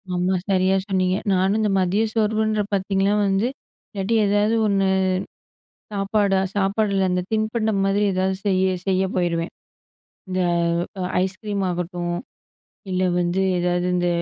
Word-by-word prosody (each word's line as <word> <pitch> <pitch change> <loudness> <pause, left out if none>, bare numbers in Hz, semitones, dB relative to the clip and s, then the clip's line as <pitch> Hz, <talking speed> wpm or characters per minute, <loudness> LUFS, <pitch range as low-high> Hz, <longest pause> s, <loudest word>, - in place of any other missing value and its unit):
ஆமா, 180 +1 +1
சரியா 190 0 +3
சொன்னீங்க. 185 -1 +1 0.2
நானும் 190 +2 +2
இந்த 215 -1 +1
மதிய 190 +4 +1
சோர்வுன்ற 215 -1 +1
பார்த்தீங்கனா 195 +1 +1
வந்து 195 +3 +1 0.5
இல்லாட்டி 200 +2 -1
ஏதாவது 205 +2 +2
ஒண்ணு 195 -1 +2 1.1
சாப்பாடா 200 -1 +1 0.2
சாப்பாடுல 195 -1 +1
அந்த 180 0 0
தின்பண்டம் 220 -1 0
மாதிரி 200 +1 +1
ஏதாவது 190 +1 0
செய்ய, 190 -2 +2 0.2
செய்ய 190 0 +2
போயிருவேன். 170 -1 -1 0.8
இந்த 185 0 -1 0.6
அ - - -1 0.2
ஐஸ்கிரீம் 200 +1 -3
ஆகட்டும், 175 0 -3 0.7
இல்ல 185 0 0 0.2
வந்து 175 +2 0 0.2
ஏதாவது 175 0 0
இந்த 175 0 +1
195 Hz, 120 wpm, -22 LUFS, 185-205 Hz, 1.1 s, சரியா